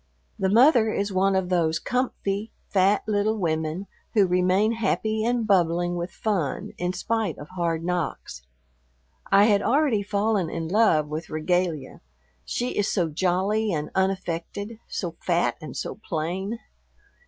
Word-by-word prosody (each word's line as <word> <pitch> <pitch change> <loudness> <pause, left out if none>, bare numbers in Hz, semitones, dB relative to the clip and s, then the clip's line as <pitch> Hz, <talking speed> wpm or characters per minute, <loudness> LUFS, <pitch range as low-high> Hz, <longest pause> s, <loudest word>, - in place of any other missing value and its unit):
The 190 - +1
mother 230 0 +5
is 200 -1 -2
one 190 +1 +2
of 190 -1 0
those 165 -3 +2
"comfy," 220 -4 -2 0.2
fat 195 +1 +3
little 215 +1 +1
women 160 0 -1 0.3
who 205 -3 +6
remain 185 +4 +2
happy 220 0 0
and 240 0 +1
bubbling 175 -3 +2
with 175 +1 -3
fun 180 -7 -2
in 180 0 0
spite 220 +4 -2
of 145 - -10
hard 170 -3 -2
knocks. 170 - -3 0.9
I 195 +1 +7
had 205 -2 +4
already 270 -4 +2
fallen 200 -3 0
in 165 0 -4
love 180 -7 +3
with 155 +2 -5
Regalia, 155 -2 -1 0.4
she 245 - -2
is 205 0 0
so 175 -5 +1
jolly 190 +6 +1
and 150 -3 -3
unaffected, 190 +3 -2
so 170 -3 -4
fat 175 -1 +1
and 155 - -7
so - - -5
plain. 185 +7 -3
190 Hz, 140 wpm, -25 LUFS, 170-215 Hz, 0.9 s, I